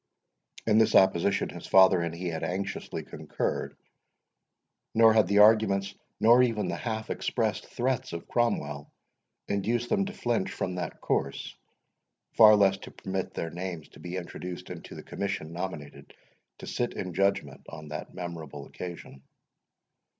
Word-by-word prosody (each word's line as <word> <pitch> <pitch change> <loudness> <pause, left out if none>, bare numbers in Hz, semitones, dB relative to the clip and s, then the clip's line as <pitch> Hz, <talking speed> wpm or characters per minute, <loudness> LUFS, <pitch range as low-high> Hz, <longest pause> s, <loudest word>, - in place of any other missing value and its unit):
In 110 0 +4
this 110 - +3
opposition, 95 0 +4
his - - -9
father 95 -2 +6
and 85 -1 -2
he 90 +1 -3
had 80 -1 -4
anxiously 95 +2 -3
concurred, - - -4 1.2
nor 115 0 +7
had 110 -4 +4
the 100 +2 +2
arguments, 105 -2 +5 0.3
nor 120 +3 +6
even 115 -4 +1
the - - -2
half 110 -2 -4
expressed 110 -5 -1
threats 125 0 -1
of 85 0 -6
Cromwell, 75 -12 -1 0.6
induced 115 +4 -1
them 200 -2 +2
to 200 - -6
flinch 120 - -1
from 90 - -3
that 90 - -5
course, 70 0 -2 0.8
far 110 -2 +8
less 100 -2 +4
to - - -10
permit 95 0 -5
their 80 - -3
names 90 -2 -6
to - - -16
be 90 +1 -6
introduced 90 0 -7
into 90 - -9
the - - -9
commission 95 -5 -4
nominated 85 -5 -7 0.4
to - - -9
sit 120 - -2
in 90 -2 -4
judgment 100 +3 0
on 75 -2 -9
that 75 +1 -6
memorable 85 -4 -7
occasion. 85 -6 -9
95 Hz, 150 wpm, -28 LUFS, 85-110 Hz, 1.2 s, far